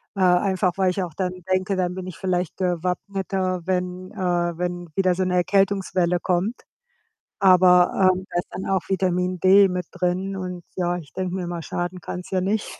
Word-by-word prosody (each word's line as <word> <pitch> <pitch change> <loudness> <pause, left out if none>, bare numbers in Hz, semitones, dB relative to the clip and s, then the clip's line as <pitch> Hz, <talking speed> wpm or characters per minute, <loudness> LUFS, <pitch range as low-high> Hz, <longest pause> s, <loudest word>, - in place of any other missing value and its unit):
äh, - - -6
einfach 180 0 +3
weil 190 -1 +3
ich 190 - -2
auch 170 -4 -5
dann 185 -2 -2 0.2
denke, 185 +1 +1
dann 180 -1 -1
bin 185 - -6
ich 185 - -7
vielleicht 180 -2 -2
gewappneter, 185 +1 -2
wenn 180 0 -2
äh, 175 -2 -1
wenn 175 0 -3
wieder 185 -2 +2
so 185 - 0
'ne 180 - -1
Erkältungswelle 185 -1 +1
kommt. 185 +7 -1 0.8
Aber, 180 -2 +6 0.2
ähm, 185 +1 -6
da 175 - -1
ist 175 - -2
dann 190 - -6
auch 190 -1 +1
Vitamin 185 -1 0
D 195 +1 +6
mit 180 -1 -3
drin 185 +2 -2
und 180 -2 -5
ja, 175 -1 0
ich 150 -4 -12
denke 185 -1 -3
mir 185 -2 -3
immer: 170 -1 -4
„Schaden 175 +2 -4
kann's 180 0 -7
ja 190 - +1
nicht.“ 205 +3 -2
185 Hz, 190 wpm, -23 LUFS, 180-190 Hz, 0.8 s, Aber